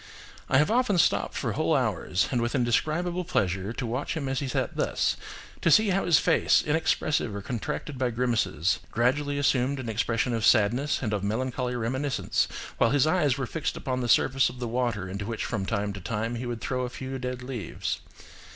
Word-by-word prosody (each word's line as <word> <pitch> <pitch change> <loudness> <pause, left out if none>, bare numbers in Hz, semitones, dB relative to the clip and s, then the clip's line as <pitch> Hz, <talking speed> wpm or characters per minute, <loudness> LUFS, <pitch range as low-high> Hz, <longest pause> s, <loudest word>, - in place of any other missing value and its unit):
"I - - +4
have 150 +8 +3
often 245 -5 +2
stopped 170 - +2
for - - -1
whole - - +1
hours, 90 - 0
and 125 -3 +1
with 120 +4 -1
indescribable 155 +9 0
pleasure, 95 - -1
to 120 - -4
watch 125 +7 -2
him 140 -4 -3
as 135 0 -1
he 140 - -3
sat 125 - -2
thus–to - - -2
see 210 +7 +5
how 195 +1 +1
his 170 -4 +5
face, - - +3
inexpressive 150 -6 0
or 100 - -5
contracted 125 +5 -4
by 130 -1 +1
grimaces, 115 -8 0
gradually 140 +5 +1
assumed 140 -1 +1
an 120 -3 -4
expression 115 +2 0
of 115 -1 -1
sadness, 120 +7 +3
and 110 -3 -1
of 100 -2 -1
melancholy 125 +3 -1
reminiscence, 130 +4 0 0.3
while - - +4
his 145 +2 +3
eyes 155 -5 +2
were 135 - -2
fixed 155 +5 -3
upon 130 -1 -2
the 120 - -2
surface 135 +3 +4
of 125 - -10
the 120 -1 -3
water 115 -5 -1
into 100 +2 -5
which 115 -1 -3
from 100 -4 -3
time 100 -2 -1
to 100 - -8
time 115 +4 -2
he 120 +1 -4
would 120 -2 -4
throw 130 -1 -2
a 125 - -2
few 130 +1 -6
dead 125 0 -4
leaves. 125 -8 -4
125 Hz, 195 wpm, -27 LUFS, 115-140 Hz, 0.3 s, see